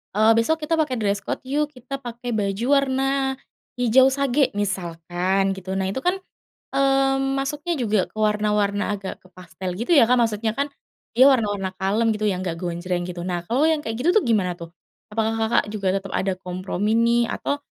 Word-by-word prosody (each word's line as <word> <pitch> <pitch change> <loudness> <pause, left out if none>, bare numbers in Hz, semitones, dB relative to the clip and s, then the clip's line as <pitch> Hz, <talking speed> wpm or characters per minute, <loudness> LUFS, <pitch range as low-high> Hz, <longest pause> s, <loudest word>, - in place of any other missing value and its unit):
eee, 215 +2 +5
besok 315 +8 +1
kita 320 +2 0
pakai 295 -5 +1
dress 205 -3 0
code - - -5
yuk 290 +3 0
kita 265 0 -7
pakai 240 -1 -6
baju 205 0 -1
warna, 270 -1 +2 0.6
hijau 250 +2 +5
sage 275 0 +1
misalkan 185 0 -1
gitu. 190 0 -6
Nah 190 0 -1
itu 230 - -3
kan, 360 +4 +1 0.6
mmm, 270 0 +2
masuknya 295 +5 -2
juga 210 -5 +1
ke - - -30
warna-warna 210 -1 +1
agak 195 -2 -7
ke - - -17
pastel 185 +1 -7
gitu 235 - +1
ya 275 - +8
Kak 245 +2 +3
maksudnya 220 -1 0
kan, 280 +3 -1 0.5
dia 255 - +7
warna-warna 205 -7 0
kalem 210 +4 +1
gitu 215 0 -1
yang 185 -3 0
gak 170 -3 -3
gonjreng 175 0 -3
gitu 175 -1 -6
nah 175 -1 -3
kalau 245 +8 +1
yang 320 - +2
kayak 225 -7 -4
gitu 335 - +4
tuh 435 - +5
gimana 205 -6 +2
tuh? 170 -2 -8 0.4
Apakah 220 +1 0
Kakak 225 +1 +2
juga 195 -3 -1
tetap 195 -1 -3
ada 190 0 0
kompromi 185 +2 -3
nih? 235 0 +2
Atau, 285 - -2
215 Hz, 185 wpm, -23 LUFS, 190-265 Hz, 0.6 s, ya